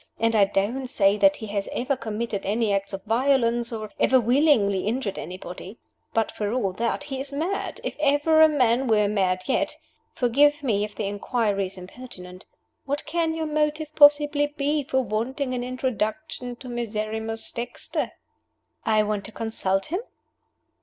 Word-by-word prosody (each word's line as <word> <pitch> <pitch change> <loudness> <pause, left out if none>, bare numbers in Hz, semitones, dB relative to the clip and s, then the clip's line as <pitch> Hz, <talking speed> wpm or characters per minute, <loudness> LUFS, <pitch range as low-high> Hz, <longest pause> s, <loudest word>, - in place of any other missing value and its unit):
And 230 0 +2
I 205 -2 +6
don't 205 +7 -1
say 200 -4 +3
that 290 +6 +5
he 220 - -7
has 200 -1 -3
ever 265 +3 -1
committed 220 -3 -4
any 215 +1 +1
acts 195 0 -1
of 195 -1 -6
violence, 235 0 +2
or 215 -2 -5
ever 260 - +5
willingly 235 -6 +3
injured 225 -3 -2
anybody. 185 +3 -8 0.3
But, 225 -1 0
for 210 -1 -3
all 200 -7 0
that, 235 +7 -1
he 275 -2 -5
is 275 +1 -5
mad, 330 +8 -2
if - - -3
ever 295 +2 +4
a 315 - +8
man 255 -3 +2
were 210 -2 +3
mad 185 -3 0
yet. 265 - 0 0.4
Forgive 290 +4 +3
me 210 -6 +1
if 210 0 -5
the 210 - -3
inquiry 205 -1 0
is 190 - -11
impertinent. 185 -2 -10 0.4
What 285 +1 -2
can 325 +1 0
your 320 -1 -2
motive 305 0 -1
possibly 290 0 +5
be 290 0 -1
for 265 0 +1
wanting 255 +5 -2
an 245 -1 -2
introduction 250 +1 -3
to 255 +2 -11
Miserrimus 220 -1 -4
Dexter?" 235 +1 -3 0.7
"I 215 -1 +3
want 210 -1 -2
to 215 - -7
consult 195 -4 -1
him?" 360 - 0
235 Hz, 165 wpm, -25 LUFS, 210-280 Hz, 0.7 s, a